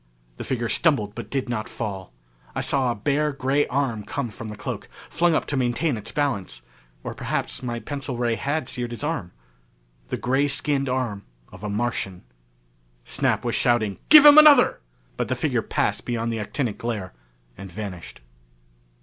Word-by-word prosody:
The - - -5
figure 120 -3 -2
stumbled 110 -9 +1
but 110 -1 -7
did 135 +1 -2
not 115 -3 -3
fall. 95 - -5 0.4
I - - -1
saw 135 -2 +1
a 120 - -1
bare 145 +7 0
gray 140 +1 +1
arm 130 -5 -1
come 140 -1 -4
from 110 +1 -8
the 105 - -6
cloak, - - -5 0.2
flung 170 -1 +2
up - - 0
to 145 - -3
maintain 130 +3 +1
its 105 - -7
balance. 100 - -2 0.4
Or - - -4
perhaps - - -3
my 120 -2 -3
pencil 135 -1 -5
ray 120 -1 +1
had 140 +4 -2
seared 125 -2 -3
his 120 +3 -7
arm. 145 - -2 0.8
The - - -3
gray 135 +3 +1
skinned 140 -1 0
arm 125 -6 -2 0.3
of 95 +2 -13
a 105 - -3
Martian. 105 -4 -2 0.8
Snap - - 0
was - - 0
shouting, 110 -5 +1
"Give 305 -1 +10
him 295 +1 +11
another!" 295 -5 +7 0.4
But - - -1
the - - -1
figure - - 0
passed - - -1
beyond 115 -1 -2
the 115 - -2
actinic 110 +1 -3
glare 110 - -4 0.4
and 95 -1 -10
vanished. 95 - -7
120 Hz, 175 wpm, -24 LUFS, 105-140 Hz, 0.8 s, him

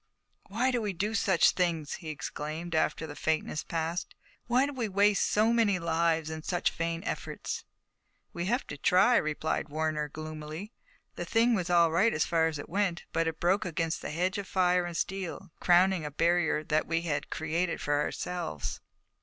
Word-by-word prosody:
"Why 235 +6 +1
do 245 -2 0
we 205 -2 -2
do 205 +5 -2
such 190 -6 +4
things?" 165 -5 -1
he 160 - -6
exclaimed, 155 +3 -5
after 155 0 +1
the 145 -2 -8
faintness 155 -1 -1
passed. 165 +1 -3 0.3
"Why 250 +3 +3
do 285 - -4
we 235 -5 -2
waste 200 +1 +3
so 220 +2 +3
many 220 -5 +3
lives 165 -2 +1
in 160 0 -5
such 175 +2 0
vain 165 0 -3
efforts?" - - -4 0.7
"We 170 0 -3
have 245 +5 0
to 145 - -8
try," 195 +10 +5
replied 155 0 -1
Warner, 155 0 -1
gloomily. 155 +5 -7 0.5
"The - - -3
thing 235 +1 +3
was 185 -5 -1
all 170 -2 +5
right 195 +8 +3
as 155 - +2
far 165 -1 +2
as 160 -2 -3
it 145 - -7
went, 185 -1 -1
but 165 0 +1
it 160 -1 -3
broke 185 +4 +2
against 165 -2 -2
a - - -3
hedge 185 +6 -1
of 200 - -6
fire 180 -1 +2
and 170 -1 -4
steel, 190 -4 -4
crowning 180 0 +4
a 150 - -3
barrier 165 0 +2
that 155 0 0
we 165 0 0
had 155 -4 -2
created 165 +2 -1
for 145 0 +1
ourselves." 175 - -4
170 Hz, 185 wpm, -30 LUFS, 155-190 Hz, 0.7 s, try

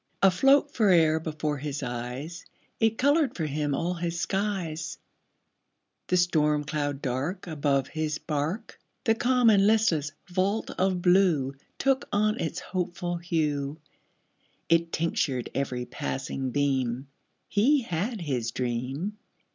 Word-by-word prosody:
Afloat 270 +10 +5
fore'er 170 -8 +4
before 155 -2 -3
his 145 0 -4
eyes, 125 +7 -5 0.4
It 225 0 +2
colored 285 0 +3
for 160 - -2
him 145 -1 -1
all 175 +4 -1
his 170 -1 -3
skies: 175 -7 -2 1.1
The 180 - +2
storm 150 -4 +2
cloud 145 -2 -2
dark 140 +9 -2
Above 145 -5 0
his 155 -1 -2
bark, 155 +6 -3 0.2
The 225 -4 +4
calm 245 0 +4
and 200 -1 +5
listless 195 -9 +2 0.2
vault 190 +4 0
of 185 -1 0
blue 175 -8 +4 0.2
Took 270 0 +1
on 215 +2 +2
its 165 +2 -2
hopeful 175 -1 -3
hue, 155 -4 -1 0.9
It 165 0 +3
tinctured 145 -6 -1
every 125 -3 -2
passing 130 +2 -3
beam 130 -2 0 0.4
He 260 +8 +3
had 200 +4 -2
his 125 -8 -1
dream. 130 - -3
165 Hz, 125 wpm, -27 LUFS, 145-195 Hz, 1.1 s, Afloat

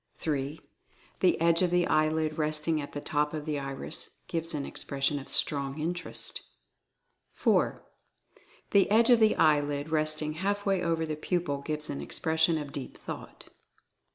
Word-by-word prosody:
3. 145 0 -2 0.6
The 185 - +3
edge 170 +1 +4
of 180 - +3
the 175 0 +3
eyelid 155 0 +1
resting 155 +1 +1
at 145 - -8
the 145 - -3
top 150 +1 0
of 150 -1 -5
the 150 -2 -1
iris 135 -1 -5
gives 165 -1 -2
an 140 -2 -2
expression 140 +1 -1
of 135 - -11
Strong 140 0 +1
Interest. 175 +3 -3 0.9
4. - - +1 0.9
The 200 -2 +4
edge 230 +3 +5
of 240 - +7
the 220 -1 +4
eyelid 145 -1 +2
resting 155 -1 +1
half 205 +1 -1
way 195 -2 +2
over 165 -1 0
the 155 -1 -3
pupil 155 -3 -2
gives 150 +1 -2
an 140 - -4
expression 160 +1 +1
of 145 -2 -5
Deep 140 -2 -7
Thought. - - -9
155 Hz, 155 wpm, -29 LUFS, 145-170 Hz, 0.9 s, of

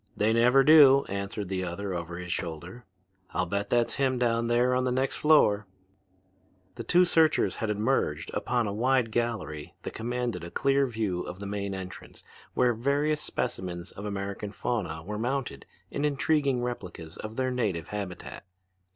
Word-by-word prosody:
"They 110 +2 +3
never 125 +4 +5
do," 140 -2 +8
answered 100 +1 -4
the 95 0 -2
other 95 +2 -4
over 85 -1 -5
his 90 -1 -3
shoulder. 85 +7 -6 0.5
"I'll 90 - +1
bet 100 +3 -2
that's 120 -1 +1
him 130 -2 +1
down 115 -1 +1
there 120 +2 +3
on 130 0 +1
the 125 - 0
next 130 +2 0
floor." 105 -10 +4 1.1
The 120 - -7
two 180 +6 +4
searchers 160 -2 +3
had 110 - -2
emerged 105 - 0
upon 120 -1 0
a 100 - -2
wide 120 +1 +2
gallery 110 -11 -3
that - - -5
commanded 120 -5 -3
a 85 - -6
clear 140 +6 +2
view 110 -7 -2
of 90 - -7
the 100 - -7
main 100 -1 -3
entrance 95 -1 -9 0.3
where 125 -1 +3
various 145 +6 0
specimens 90 -1 -4
of 100 - -8
American 100 0 -4
fauna 90 -5 -3
were 105 +4 -5
mounted 125 - -3 0.2
in 140 - -2
intriguing 140 -3 +1
replicas 90 -9 -6
of 110 +1 -7
their 130 0 0
native 105 -10 -2
habitat. 100 -4 -6
110 Hz, 165 wpm, -28 LUFS, 95-125 Hz, 1.1 s, do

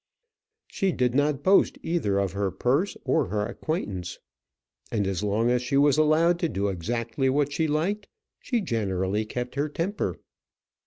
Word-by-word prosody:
She 195 -1 -1
did 125 -6 +1
not 145 +1 +1
boast 195 +1 +4
either 160 - 0
of 100 -2 0
her 100 0 -1
purse 130 - 0
or 155 -6 +2
her 105 +2 -1
acquaintance; 105 - -4 0.7
and 105 -3 0
as 95 -2 -1
long 105 +3 +1
as 125 0 +2
she 125 +2 0
was 145 +1 +4
allowed 160 +3 +4
to 170 - 0
do 100 -4 -1
exactly 115 +7 -1
what 145 +1 +1
she 160 +1 +1
liked 180 +8 -1 0.3
she 240 -3 -1
generally 105 - -1
kept 125 +3 -4
her 145 +2 -1
temper. 175 +7 -2
125 Hz, 160 wpm, -26 LUFS, 105-155 Hz, 0.7 s, boast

